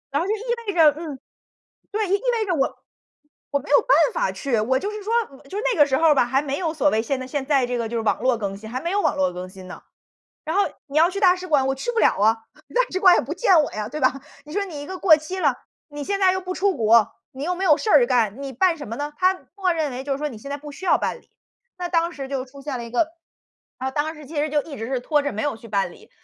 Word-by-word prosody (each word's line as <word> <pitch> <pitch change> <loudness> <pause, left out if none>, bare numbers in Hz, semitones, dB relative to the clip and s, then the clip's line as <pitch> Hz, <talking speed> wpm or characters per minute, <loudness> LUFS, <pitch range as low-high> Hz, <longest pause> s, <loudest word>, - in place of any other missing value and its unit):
然 285 - +1
后 350 - -2
就 420 - +1
意 435 - -8 0.2
味 400 - -1
着 320 -4 +6
嗯， 310 -5 -6 0.7
对， 425 0 -1
意 - - -4 0.3
味 435 - 0
着 370 - 0
我 270 -3 0 0.7
我 285 - +1
没 280 - -12
有 285 - +6
办 - - +4 0.2
法 - - 0
去。 255 -6 -1
我 250 +5 +1
就 400 +10 -3
是 425 - -6
说， 440 +3 -2 0.4
就 390 - -5 0.2
那 - - -4
个 295 - +8
时 265 -2 +1
候 330 - +4
儿 300 - +5
吧 260 - +4
还 265 +3 +1
没 280 -1 -3
有 330 -4 -2
所 300 -1 +2
谓 220 -5 +1
现 260 +4 -2
在 260 - -5
现 275 0 -3
在 275 -3 +2
这 245 0 -2
个 230 -1 -2
就 235 - -2
是 - - 0
网 220 - 0
络 255 -1 +2
更 200 -3 -4
新， 220 +2 -10
还 255 +3 -4
没 340 - -2
有 405 +1 +1
网 - - +1
络 185 -1 +1
更 180 +1 -7
新 185 -1 -12
呢。 180 - -10 0.6
然 320 +3 -2
后 405 - +5 0.2
你 285 -1 -7
要 335 +3 +5
去 395 +1 -4
大 365 -3 +5
使 365 0 -7
馆， 290 -6 +2
我 270 - +1
去 270 - -3
不 460 - +1
了 - - +4
啊， 215 +2 +4 0.4
大 - - +5
使 375 - -1
馆 370 -3 +7
也 - - +3
不 - - -5
见 375 -9 +4
我 - - -3
呀， 210 0 -4
对 300 +6 -6
吧。 260 +1 +2 0.2
你 300 - -11
说 405 +3 0
你 325 -7 -7
一 - - -8
个 375 +2 -6
过 340 -4 +7
期 310 +5 -6
了， 290 -8 +2 0.3
你 290 -1 -7
现 400 +6 -1
在 380 -1 +4
又 375 - -1
不 370 0 -5
出 395 0 +1
国， 225 -2 +4 0.2
你 265 +2 -6
又 360 +3 0
没 375 +2 -3
有 305 -5 +6
事 435 - -2
儿 485 - +6
干， 235 - +1
你 275 -1 -5
办 340 +7 +2
什 290 - -8
么 230 - -5
呢？ 290 +2 -4
它 370 +1 +4 0.2
默 380 -3 +1
认 315 -3 -1
为 250 +1 -5
就 275 0 -3
是 270 - -2
说 300 +1 -2
你 235 -6 -9
现 275 +6 -9
在 285 - -2
不 295 0 -10
需 330 - -10
要 - - +5
办 - - -3
理， - - -32 0.5
那 355 -1 -3
当 335 -1 +1
时 275 -4 -6
就 270 -2 -3
出 275 +2 -14
现 280 -2 -4
了 235 - -6
一 235 - -9
个 245 +7 +2 0.7
然 260 +1 -2
后 - - -3
当 310 +2 -1
时 300 -2 -12
其 310 - -11
实 295 +1 +1
就 295 0 +1
一 290 -2 -9
直 225 - -5
是 260 +1 -1
拖 295 +3 +1
着 285 - -1
没 215 - -3
有 290 -5 -1
去 230 - -13
办 195 -4 0
理。 - - -18
290 Hz, 330 characters per minute, -23 LUFS, 255-360 Hz, 0.7 s, 个